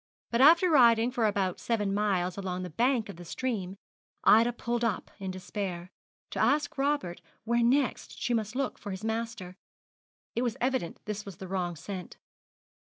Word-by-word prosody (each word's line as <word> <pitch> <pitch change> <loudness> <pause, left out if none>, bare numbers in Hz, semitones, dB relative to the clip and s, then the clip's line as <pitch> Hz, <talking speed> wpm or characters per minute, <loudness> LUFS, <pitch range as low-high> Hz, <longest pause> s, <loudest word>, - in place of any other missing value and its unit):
But 235 +1 +2
after 335 +6 +7
riding 240 -6 +5
for 235 -3 +1
about 195 -3 0
seven 210 -4 0
miles 190 -4 0
along 185 -2 -3
the 180 - -6
bank 240 - +1
of 200 - -9
the 175 - -9
stream, 195 -1 -3 0.5
Ida 230 +3 +6
pulled 240 0 -2
up 225 -5 -1
in 190 -1 -4
despair, 185 -1 -5 0.4
to - - -4
ask 290 0 +2
Robert 280 -11 0 0.2
where 235 +2 +1
next 255 +3 +1
she 245 - 0
must 220 -1 -1
look 270 -1 -2
for 205 - -7
his 190 +1 -6
master. 225 -5 -4 0.8
It 235 - +1
was 240 -3 -1
evident 255 -9 -1
this 210 -1 -4
was 195 -4 -10
the 190 - -8
wrong 180 -2 -2
scent. 185 +3 -7
215 Hz, 170 wpm, -29 LUFS, 185-240 Hz, 0.8 s, after